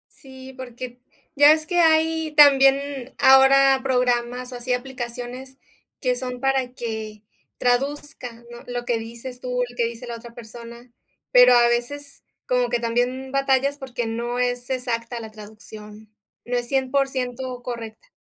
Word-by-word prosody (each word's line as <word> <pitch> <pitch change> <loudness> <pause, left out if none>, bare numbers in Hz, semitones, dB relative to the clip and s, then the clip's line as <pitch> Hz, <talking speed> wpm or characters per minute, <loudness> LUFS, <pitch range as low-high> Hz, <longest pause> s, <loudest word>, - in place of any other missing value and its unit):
Sí, 265 -1 -13
porque 250 -1 -8 0.4
ya 290 +1 +7
ves 310 0 +2
que 350 +2 0
hay 320 -1 +2
también 275 -2 +4
ahora 270 0 +6
programas, 250 -1 0
o 250 - -7
así, 245 +1 -2
aplicaciones 250 +1 -6 0.4
que 250 -2 +1
son 250 0 -5
para 265 -2 0
que 220 -3 -6 0.3
traduzcan, 250 -2 -2
¿no? 240 - -11
Lo 245 -1 -4
que 240 -1 0
dices 235 +3 -8
tú, 250 0 -2
lo 245 - -14
que 235 - +2
dice 235 +1 -6
la 235 - -5
otra 235 0 -12
persona, 235 +1 -11 0.4
pero 250 0 +7
a 240 -1 +6
veces 275 +4 -3 0.2
como 250 -1 +1
que 240 0 0
también 245 +3 -1
batallas 275 +1 +1
porque 245 -4 -5
no 235 +2 -3
es 245 0 -1
exacta 240 -2 -3
la 220 -1 -9
traducción, 215 0 -12 0.4
no 245 0 -1
es 240 0 -2
100% 260 -1 -1
correcta. 235 - -8
250 Hz, 150 wpm, -23 LUFS, 240-265 Hz, 0.4 s, ya